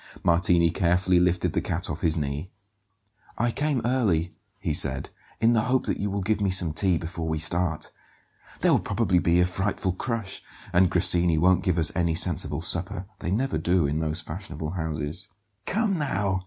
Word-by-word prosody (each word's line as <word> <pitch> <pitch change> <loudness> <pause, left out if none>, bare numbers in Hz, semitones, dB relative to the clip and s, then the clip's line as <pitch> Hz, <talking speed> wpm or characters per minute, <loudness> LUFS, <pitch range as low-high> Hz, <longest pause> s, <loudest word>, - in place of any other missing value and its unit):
Martini 85 0 +3
carefully 90 +1 +2
lifted 90 0 +1
the - - 0
cat - - -2
off - - -5
his 80 0 +2
knee. 75 +3 -4 0.9
"I 120 +1 0
came 145 -2 -1
early," 100 -10 0 0.3
he - - -2
said, - - +2 0.3
"in 115 +1 +3
the 110 - +3
hope 130 +1 +1
that - - -2
you 100 - -2
will 100 0 -3
give 105 +2 0
me 100 - +1
some 90 -4 +2
tea 90 0 +3
before 80 0 -5
we 80 0 -1
start. 80 +1 0 0.7
There - - +3
will - - +4
probably 90 -1 0
be 85 0 +2
a 90 - +4
frightful 95 +1 -2
crush, 110 -1 -4 0.3
and 90 +1 +4
Grassini 85 -2 +4
won't 90 +3 +3
give 90 -2 0
us 80 -1 +4
any 85 -3 0
sensible 80 -3 +1
supper 90 +2 0
they - - -4
never 115 -1 -1
do 85 0 +1
in 75 +2 -1
those 80 +1 -1
fashionable 80 -2 -6
houses." 80 +3 -3 0.4
"Come 205 -3 0
now!" 100 -9 -1
90 Hz, 180 wpm, -25 LUFS, 80-100 Hz, 0.9 s, will